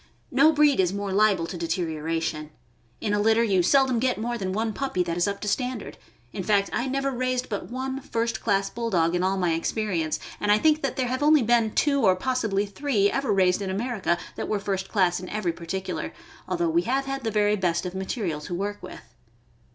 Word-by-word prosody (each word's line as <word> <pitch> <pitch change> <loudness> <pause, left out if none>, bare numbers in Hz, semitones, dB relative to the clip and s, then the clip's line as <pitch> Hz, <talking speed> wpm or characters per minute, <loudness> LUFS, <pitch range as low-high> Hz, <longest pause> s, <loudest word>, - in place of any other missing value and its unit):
No 280 +5 +5
breed 300 -4 +4
is 180 -2 +3
more 200 0 -3
liable 200 -4 +3
to 175 - -6
deterioration. 160 -2 -2 0.5
In 210 -2 -1
a 205 - +2
litter 220 +2 +3
you 195 -5 +3
seldom 260 +4 +3
get 255 +1 +1
more 240 +3 -2
than 190 -5 -3
one 220 +3 -1
puppy 265 -9 -1
that 170 -1 -3
is 175 +3 +1
up 200 0 -2
to 210 - -4
standard; 250 +2 -2 0.4
in - - -3
fact, 200 +1 +1
I 240 - -1
never 275 +1 -1
raised 255 0 -1
but 205 - -4
one 265 +2 -4
first 230 -3 -2
class 195 -2 +1
Bulldog 195 -7 0
in 175 - +1
all 190 +1 +1
my 175 -3 +1
experience, 165 -2 -1 0.2
and 205 - +1
I 210 - +6
think 310 +5 +3
that 275 -3 -2
there 260 - 0
have 255 +1 -2
been 290 - +2 0.2
only 235 -1 +3
two, 280 +5 +1
or 190 -3 +5
possibly 215 -2 0
three, 205 -1 +1
ever 275 0 -1
raised 185 -1 +3
in 195 - -3
America 200 -3 -1 0.2
that - - -3
were 210 - +1
first 195 -1 -3
class 180 -4 +2
in 185 - -8
every 195 -5 -1
particular, 185 +3 -4 0.3
although 345 0 0
we 340 +1 +3
have 270 -2 -1
had 270 -1 -4
the 225 - 0
very 210 -1 +2
best 180 -3 0
of 180 - -4
material 190 -4 -3
to 175 - -5
work 205 +3 -3
with. - - -10
205 Hz, 215 wpm, -25 LUFS, 185-250 Hz, 0.5 s, I